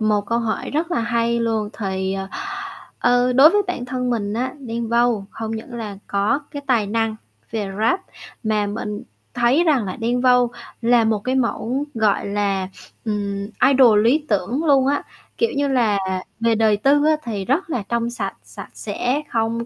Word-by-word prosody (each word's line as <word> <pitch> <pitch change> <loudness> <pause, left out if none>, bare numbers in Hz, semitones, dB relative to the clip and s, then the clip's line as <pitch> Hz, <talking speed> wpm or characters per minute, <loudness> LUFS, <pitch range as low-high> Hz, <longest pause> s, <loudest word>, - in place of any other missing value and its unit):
Một 215 -1 +2
câu 230 +3 +1
hỏi 225 -2 -2
rất 330 +4 -1
là 235 - +1
hay 235 0 0
luôn, 220 -2 0
thì, 190 -2 -2
ờ, 195 0 -4 0.7
ờ, 245 +1 +3
đối 270 +5 +8
với 415 +3 +3
bản 265 -9 -3
thân 250 0 -2
mình 210 -4 -1
á, 250 +3 -2
Đen 235 -3 -4
Vâu 235 -3 +2
không 225 0 -5
những 225 +2 -6
là 215 -4 -5
có 200 +8 +1
cái 285 - -5
tài 225 -6 +2
năng 225 0 0 0.4
về 215 -3 -2
Rap, 365 - +2 0.4
mà 215 -2 +1
mình 210 0 -4 0.3
thấy 245 +7 +3
rằng 285 - +2
là 185 - -4
Đen 240 +2 -1
Vâu 250 -1 +4 0.3
là 235 0 +4
một 220 -2 +1
cái 255 +5 -2
mẫu, 255 +2 -1
gọi 220 -3 +1
là, 200 -2 0 0.4
ừm, 200 -1 -2 0.2
idol 245 -6 +6
lý 290 +7 +3
tưởng 210 - 0
luôn 275 -3 +4
á. 285 - +1 0.3
Kiểu 460 - +2
như 280 0 +1
là, 235 -6 +2 0.4
về 230 0 +2
đời 215 -1 +3
tư 285 +7 +3
á 310 0 +4
thì 205 -5 -4
rất 295 - 0
là 245 -9 -2
trong 235 0 0
sạch, 240 - -4
sạch - - -10
sẽ, 260 +5 -2
không 230 0 -1
230 Hz, 185 wpm, -21 LUFS, 210-255 Hz, 0.7 s, đối